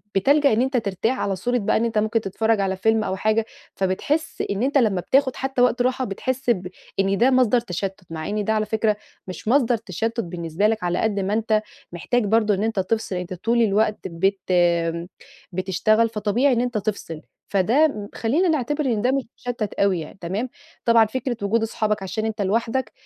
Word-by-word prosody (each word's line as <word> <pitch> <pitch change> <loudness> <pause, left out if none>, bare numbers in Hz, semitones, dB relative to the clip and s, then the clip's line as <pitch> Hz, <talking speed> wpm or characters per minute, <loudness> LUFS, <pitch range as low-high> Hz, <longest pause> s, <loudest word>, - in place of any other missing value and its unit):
بتلجأ 280 +7 +4
إن 225 - +2
أنت 265 0 +1
ترتاح 225 +3 -1
على 195 -1 -1
صورة 245 +7 -1
بقى، 205 - +1
إن 230 - +1
أنت 225 -2 -2
ممكن 220 +2 +1
تتفرَّج 220 +2 0
على 190 -1 0
فيلم 220 +3 +2
أو 190 - -2
حاجة، 215 +3 +1 0.3
فبتحِس 280 +12 -1
إن 200 +3 -1
أنت 280 +2 +2
لمّا 210 -8 +2
بتاخد 260 +4 +2
حتى 265 -2 -1
وقت 245 0 +3
راحة، 255 +1 +1
بتحِس 260 +5 -3
ب 185 -6 +1 0.3
إن 195 0 +2
ده 255 +3 +4
مصدر 250 -2 +4
تشتُّت. 195 -2 -4
مع 160 +2 -5
إن 210 0 -1
ده 220 - 0
على 215 0 +1
فكرة، 215 -1 0 0.3
مش 185 +2 -8
مصدر 245 -1 +3
تشتُّت 225 +2 -3
بالنسبة 170 0 -1
لك، 220 -2 -1
على 175 0 0
قدر 205 -3 0
ما 200 - -1
أنت 215 -1 +1 0.3
محتاج 230 +7 0
برضه 215 0 +3
إن 195 +1 -1
أنت 220 -3 0
تفصل. 200 0 -1
أنت 180 0 -4
طول 230 +6 +1
الوقت 215 0 +2
بت 190 +3 0 1.1
بتشتغل، 195 +5 +2
فطبيعي 225 +5 +1
إن 235 - +1
أنت 245 -2 -1
تفصل. 200 -7 -4 0.3
فده 215 - +2
خلِّينا 290 +12 +1
نعتبر 295 -1 0
إن 225 -5 +1
ده 250 +3 +2
مش 270 -1 0
مُشتِّت 240 -4 -4
أوي 195 -3 +1
يعني، 155 +4 -9
تمام. 200 +9 -3 0.4
طبعًا، 230 -1 +6
فكرة 240 +1 -3
وجود 220 +3 +1
أصحابك، 215 -2 -1
عشان 205 +4 -3
أنت 220 -2 -2
لوحدك 225 +3 0
220 Hz, 195 wpm, -23 LUFS, 195-245 Hz, 1.1 s, طبعًا